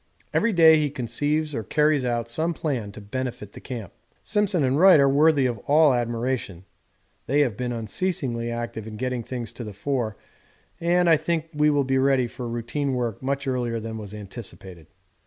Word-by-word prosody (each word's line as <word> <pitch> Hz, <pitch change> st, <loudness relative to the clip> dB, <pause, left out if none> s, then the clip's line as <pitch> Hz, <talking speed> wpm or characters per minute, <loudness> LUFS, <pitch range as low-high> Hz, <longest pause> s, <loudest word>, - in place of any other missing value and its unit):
Every 230 Hz, -, +2 dB
day 160 Hz, -4 st, +7 dB
he 150 Hz, -1 st, +1 dB
conceives 145 Hz, +5 st, -1 dB
or 115 Hz, -, -2 dB
carries 150 Hz, +5 st, +2 dB
out 120 Hz, -2 st, -1 dB
some 160 Hz, +8 st, -1 dB
plan 125 Hz, -11 st, -3 dB
to -, -, -9 dB
benefit 110 Hz, -1 st, -5 dB
the -, -, -10 dB
camp. 115 Hz, -8 st, -7 dB, 0.3 s
Simpson 205 Hz, -6 st, +1 dB
and 135 Hz, +2 st, +1 dB
Wright 185 Hz, -3 st, +8 dB
are 140 Hz, -, +5 dB
worthy 145 Hz, 0 st, +4 dB
of 120 Hz, -4 st, -1 dB
all 150 Hz, -1 st, +5 dB
admiration: 120 Hz, -5 st, -2 dB, 0.6 s
they 145 Hz, +3 st, +3 dB
have 125 Hz, -8 st, +1 dB
been 125 Hz, +2 st, -3 dB
unceasingly 120 Hz, -, -2 dB
active 115 Hz, -2 st, -5 dB
in 110 Hz, -1 st, -7 dB
getting 125 Hz, 0 st, -2 dB
things 120 Hz, -1 st, -6 dB
to 120 Hz, -, -7 dB
the 105 Hz, -2 st, -7 dB
fore 110 Hz, 0 st, -2 dB, 0.6 s
and 175 Hz, +1 st, +2 dB
I 165 Hz, -2 st, +6 dB
think 160 Hz, +1 st, -2 dB
will 150 Hz, -1 st, +3 dB
be 135 Hz, 0 st, +1 dB
ready 135 Hz, -1 st, +3 dB
for 120 Hz, +1 st, -6 dB
routine 120 Hz, +4 st, -2 dB
work 120 Hz, -4 st, -2 dB
much 140 Hz, +1 st, -2 dB
earlier 120 Hz, -3 st, -1 dB
than 110 Hz, 0 st, -6 dB
was 105 Hz, -1 st, -8 dB
anticipated. 95 Hz, -, -9 dB
130 Hz, 180 wpm, -24 LUFS, 115-150 Hz, 0.6 s, Wright